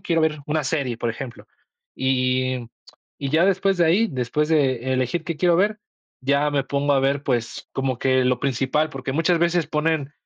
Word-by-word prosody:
quiero 165 -1 0
ver 155 -1 +1
una 150 -1 -1
serie, 135 -5 -1
por 120 - -1
ejemplo, 120 +1 -8 0.5
y 130 -1 0 0.5
y 140 - -2
ya 160 +4 +4
después 195 0 +2
de 170 - +4
ahí, 195 +8 +3
después 130 - -1
de 130 -5 +1
elegir 130 +6 -1
qué 170 -2 -3
quiero 170 +1 +3
ver, 210 +3 +1 0.4
ya 140 +2 +1
me 145 -1 +1
pongo 140 +1 0
a 135 - +3
ver, 140 +1 +1
pues, 120 -1 -2
como 130 -2 -2
que 130 0 +2
lo 125 -1 +2
principal, 140 +3 0
porque 135 0 -5
muchas 165 +4 +2
veces 170 -2 +2
ponen 150 -1 -1
140 Hz, 185 wpm, -23 LUFS, 130-160 Hz, 0.5 s, ya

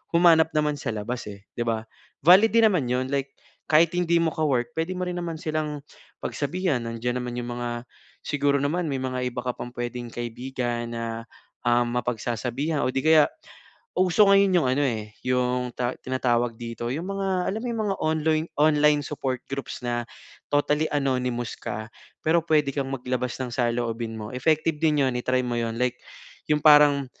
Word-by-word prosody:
humanap 165 -2 +6
naman 150 -1 +1
sa - - -3
labas, 115 +4 -4
eh, 100 -1 -9 0.2
'di - - +2
ba? 110 -1 0 0.4
Valid 190 +7 +7
din 230 -1 +7
naman 150 -10 0
'yon. 130 +2 -1
Like, 140 -1 -2 0.4
kahit 160 +2 +5
hindi 170 -1 +2
mo 160 - +1
ka-work 140 -3 0
pwede 165 +3 -1
mo 185 - -2
rin 180 - -3
naman 170 -2 -4
silang 155 -1 -2 0.4
pagsabihan 150 -2 -1
nandiyan 120 +2 -2
naman 120 -1 -5
'yong 120 0 -5
mga 120 0 -3 0.5
siguro 140 -1 +1
naman 165 +4 0
may 135 -2 -2
mga 130 -1 -2
iba 120 - -5
ka 125 - -1
pang 120 - -6
pwedeng 120 0 -4
kaibigan 120 0 -3
na, 115 0 -4 0.4
ah, 120 0 +3
mapagsasabihan 125 +5 -2
o - - +1
'di 135 - +1
kaya, 160 -1 +6 0.7
uso 185 +3 +4
ngayon 195 -1 +5
'yong 130 - +1
ano, 145 - +2
eh, 110 -3 -3
'yong 125 0 +1
ta 125 0 -1
tinatawag 120 -2 0
dito 115 0 -5
'yong 160 +6 -3
mga 195 0 -2 0.2
alam 215 +3 -3
mo - - -4
'yong 230 -2 -1
mga 195 - 0
onloin 155 0 +1
online 150 -1 +4
support 130 -4 -3
groups 135 0 -4
na 120 0 0 0.5
totally 150 +2 +2
anonymous 125 -4 -1
ka, 110 +1 -5 0.4
pero 165 +2 +4
pwede 150 -4 +2
kang 140 -2 -2
maglabas 125 -1 -2
ng 130 -1 -3
saloobin 115 -2 -1
mo. 105 +2 -7
Effective 155 +4 +1
din 150 -3 +3
'yon 130 - 0
i-try 130 +1 +1
mo 120 - -2
'yon, 115 -1 -2
like 125 0 0 0.5
yung 150 - +4
parang, 150 -2 +6
130 Hz, 175 wpm, -25 LUFS, 120-155 Hz, 0.7 s, Valid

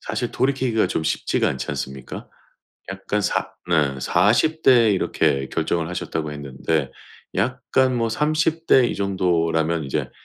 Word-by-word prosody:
사실 - - -3
돌이키기가 130 -4 +1
좀 80 - -2
쉽지가 80 - 0
않지 65 - -4
않습니까? 65 -2 -6 0.6
약간 - - -2
사 - - -1 0.2
네 75 -6 +1
40 115 - +2
대에 120 -4 +6
이렇게 70 -7 0
결정을 80 -1 -1
하셨다고 80 -3 -4
했는데 70 +1 -2 0.5
약간 130 +4 +1
뭐 115 -1 0
30 155 +6 0
대 130 - +6
이 - - -3
정도라면 85 -4 0
이제 70 - -3
90 Hz, 275 characters per minute, -22 LUFS, 75-125 Hz, 0.6 s, 대에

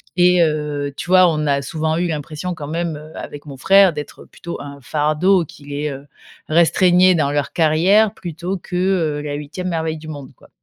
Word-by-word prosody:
Et 180 0 +4
heu, 150 -2 -2
tu - - -7
vois, 185 -1 +6
on 155 -1 -1
a 140 -1 +1
souvent 160 +3 -2
eu 175 +1 0
l'impression, 155 +3 -4
quand 145 -3 -7
même, 165 0 -2
heu, 150 +1 -11
avec 145 +1 -8
mon 140 -2 -9
frère, 195 +4 +5
d'être 150 -1 -8
plutôt 170 - -8
un 140 0 -9
fardeau 155 - +1
qui 145 - -16
les, 145 +1 -3
heu, 140 +1 -8 0.4
restreignait 180 +2 +4
dans 145 -3 +1
leur 145 -1 -1
carrière, 185 +7 +3
plutôt 175 +2 -5
que, 180 - -8
heu, 180 -5 0
la 150 -1 -5
8e 150 +5 -5
merveille 160 -2 -2
du 155 0 -11
monde, 145 -4 -8
quoi. - - -21
155 Hz, 200 wpm, -19 LUFS, 145-180 Hz, 0.4 s, vois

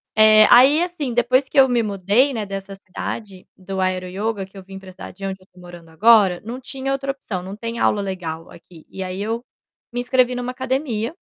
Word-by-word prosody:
Eh, 215 0 +7
aí 270 +7 +7
assim 345 -8 -3
depois 255 +3 +2
que 275 - +2
eu 265 - +6
me 240 -2 +1
mudei, 205 +7 +1
né, 220 -4 -3
dessa 195 0 -7
cidade, 195 0 -7
do 190 0 -6
aero 185 -1 -1
ioga, 200 +1 -3
que 195 +1 -17
eu 190 - -10
vim 195 +1 -10
pra 190 -1 -12
cidade 185 - -11
de 195 - -6
onde 190 0 -4
eu 185 - -20
tô 180 - -18
morando 175 -2 -13
agora, 200 0 +4
não 240 +4 -6
tinha 265 +1 -5
outra 275 0 -1
opção, 220 -9 -6
não 190 +2 -7
tem 230 +2 -5
aula 205 - +2
legal 170 -4 -5
aqui 165 -3 -16
e 190 - -6
aí 185 +1 -5
eu 225 +3 -3 0.5
me 245 - -2
inscrevi 250 0 +2
numa 245 0 -3
academia 260 0 -3
215 Hz, 220 wpm, -21 LUFS, 190-250 Hz, 0.5 s, Eh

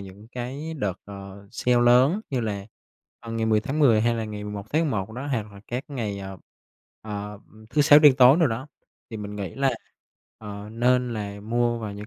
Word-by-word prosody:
những 100 +3 -12
cái 135 +6 -5
đợt, 100 - -3
ờ, 100 0 -10
sale 125 -1 +2
lớn 130 - +5
như 130 -3 0
là, 100 -3 -3 0.5
ờ, 115 - -8
ngày 115 0 -1
10 110 -1 +3
tháng 140 +7 -3
10, 115 -7 +5
hay 120 +1 +2
là 115 -1 -2
ngày 105 -1 -6
11 105 -1 -6
tháng 155 +2 +2
11 110 -9 -2
đó, 130 +4 -6
hoặc 110 -7 -3
là 100 - -12
các 125 +3 -4
ngày, 110 -8 -4
ờ, 95 -1 -8 0.6
ờ, 105 -1 -6 0.3
thứ 150 +3 +3
Sáu 145 +1 +8
đen 150 -3 +7
tối 130 +3 +7
đồ 165 - +5
đó, 125 +4 -3 0.4
thì 110 - -5
mình 105 0 -6
nghĩ 95 -4 -5
là, 135 0 +2 0.7
ờ, 105 -1 -8
nên 125 +1 +2
là 100 -1 -5
mua 120 +2 0
vào 105 -3 -5
những 105 +1 -8
110 Hz, 210 wpm, -25 LUFS, 105-125 Hz, 0.7 s, Sáu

